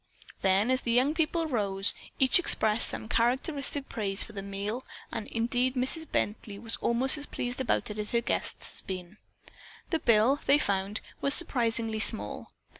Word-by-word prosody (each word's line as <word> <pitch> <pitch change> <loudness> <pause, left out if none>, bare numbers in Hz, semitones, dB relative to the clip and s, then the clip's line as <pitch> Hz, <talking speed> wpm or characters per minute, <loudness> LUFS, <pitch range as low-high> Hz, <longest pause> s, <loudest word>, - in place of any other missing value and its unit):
Then, 195 +5 +2
as 260 +1 +1
the - - -5
young 255 +5 +3
people 325 +1 0
rose, 200 -8 +2 0.2
they 265 - +3
each 260 - +5
expressed 220 -10 +2
some 220 - -6
characteristic 275 +4 -1
praise 195 -3 0
for - - -10
the 200 - -5
meal 200 +5 -4 0.3
and 210 - -5
indeed 245 +3 -1
Mrs. 265 +6 -2
Bently 205 -1 -2
was 225 +1 +1
almost 255 +5 +1
as 290 - -5
pleased 245 +2 -4
about 240 - -1
it 210 - -7
as 210 - -1
her 235 - +2
guests 235 - -4
had - - -15
been. 185 +1 -6 0.7
The 325 - +1
bill, 235 +3 +3
they 285 - +6
found, 200 -4 -1 0.2
was 280 - +5
surprisingly 230 -7 +2
small. 105 - +2
235 Hz, 175 wpm, -28 LUFS, 210-265 Hz, 0.7 s, they